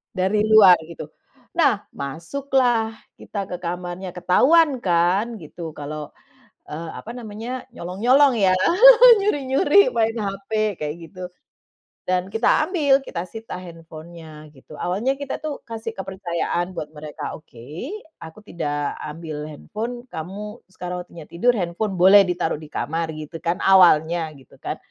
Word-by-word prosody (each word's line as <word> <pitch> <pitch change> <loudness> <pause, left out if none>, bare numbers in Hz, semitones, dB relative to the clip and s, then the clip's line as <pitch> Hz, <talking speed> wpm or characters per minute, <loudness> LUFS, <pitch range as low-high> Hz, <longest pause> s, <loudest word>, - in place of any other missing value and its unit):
dari 190 +3 +1
luar, 205 -5 +8
gitu. 170 - -9 0.5
Nah, 245 -11 +2
masuklah 235 - -1 0.3
kita 200 -2 -5
ke 180 - -4
kamarnya, 180 +1 -5
ketahuan 265 - +4
kan, 190 +6 +1
gitu, 160 +1 -8
kalau, 150 0 -6 0.6
eee, 160 +2 -6
apa 230 - -9
namanya, 230 +3 -7
nyolong-nyolong 245 +10 +3
ya, 190 -2 +4 0.7
nyuri-nyuri 290 +1 +3
main 225 0 +1
HP, 200 -1 -5 0.3
kayak 150 +1 -3
gitu. 185 -2 -10 0.8
Dan 185 +1 -1
kita 225 +1 +3
ambil, 285 -7 +2
kita 170 0 -4
sita 225 0 -8
handphone-nya, 165 -2 -12
gitu. 135 - -14
Awalnya 220 +10 -1
kita 280 -1 -5
tuh, 310 -2 -5
kasih 225 0 -5
kepercayaan 185 -1 -3
buat 150 - -4
mereka, 150 0 -7
"Oke, 150 - -10 0.3
aku 160 +5 -11
tidak 145 -5 -3
ambil 150 -1 -6
handphone, 230 - -6
kamu 205 +7 -7
sekarang 180 -1 -5
waktunya 165 -3 -12
tidur, 240 +9 +2
handphone 185 +3 -2
boleh 190 +3 +8
ditaruh 175 -3 -1
di 155 - -11
kamar," 160 +2 -3
gitu 155 +2 -8
kan, 170 +1 0
awalnya, 170 -3 +5
gitu 130 - -19
kan. - - -4
185 Hz, 130 wpm, -22 LUFS, 165-225 Hz, 0.8 s, luar